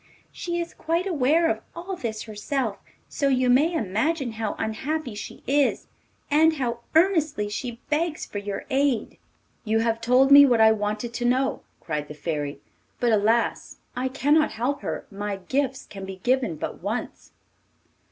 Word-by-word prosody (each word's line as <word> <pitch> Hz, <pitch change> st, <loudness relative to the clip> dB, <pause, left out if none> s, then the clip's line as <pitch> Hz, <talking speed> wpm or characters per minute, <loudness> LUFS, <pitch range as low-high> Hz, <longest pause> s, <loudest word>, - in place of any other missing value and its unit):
She 345 Hz, -1 st, -4 dB
is 340 Hz, 0 st, -4 dB
quite 335 Hz, +3 st, -1 dB
aware 325 Hz, -1 st, +2 dB
of -, -, 0 dB, 0.2 s
all 355 Hz, +3 st, -5 dB
this 220 Hz, -8 st, -4 dB
herself, 220 Hz, +1 st, -3 dB, 0.3 s
so 280 Hz, -, -1 dB
you 255 Hz, -2 st, +3 dB
may 295 Hz, +7 st, +4 dB
imagine 255 Hz, -, -1 dB
how 220 Hz, -1 st, -3 dB
unhappy 260 Hz, +5 st, -3 dB
she 205 Hz, -, -8 dB
is, 280 Hz, +1 st, +2 dB, 0.5 s
and 320 Hz, +2 st, +5 dB
how 240 Hz, -4 st, -2 dB, 0.2 s
earnestly 320 Hz, -, +3 dB
she 235 Hz, +2 st, -5 dB
begs 315 Hz, +1 st, 0 dB
for 205 Hz, -, -5 dB
your 200 Hz, -1 st, -5 dB
aid.' 270 Hz, -4 st, 0 dB, 0.4 s
'You 225 Hz, -1 st, +1 dB
have 230 Hz, 0 st, 0 dB
told 255 Hz, +3 st, +4 dB
me 285 Hz, 0 st, +11 dB
what 245 Hz, -5 st, +4 dB
I 220 Hz, 0 st, +7 dB
wanted 215 Hz, +2 st, -2 dB
to 240 Hz, -, -2 dB
know,' 260 Hz, +2 st, +1 dB, 0.2 s
cried 150 Hz, -2 st, -4 dB
the 150 Hz, -, -9 dB
Fairy, 145 Hz, -2 st, -3 dB, 0.4 s
'but 240 Hz, -1 st, +2 dB
alas! 220 Hz, +2 st, +1 dB, 0.2 s
I 255 Hz, +1 st, -1 dB
cannot 290 Hz, +4 st, +2 dB
help 250 Hz, +6 st, -2 dB
her; -, -, -4 dB
my 205 Hz, 0 st, -3 dB
gifts 265 Hz, +7 st, -2 dB
can 195 Hz, -1 st, -9 dB
be 190 Hz, 0 st, -6 dB
given 250 Hz, -8 st, +1 dB
but -, -, -6 dB
once. -, -, -5 dB
250 Hz, 160 wpm, -25 LUFS, 215-290 Hz, 0.5 s, me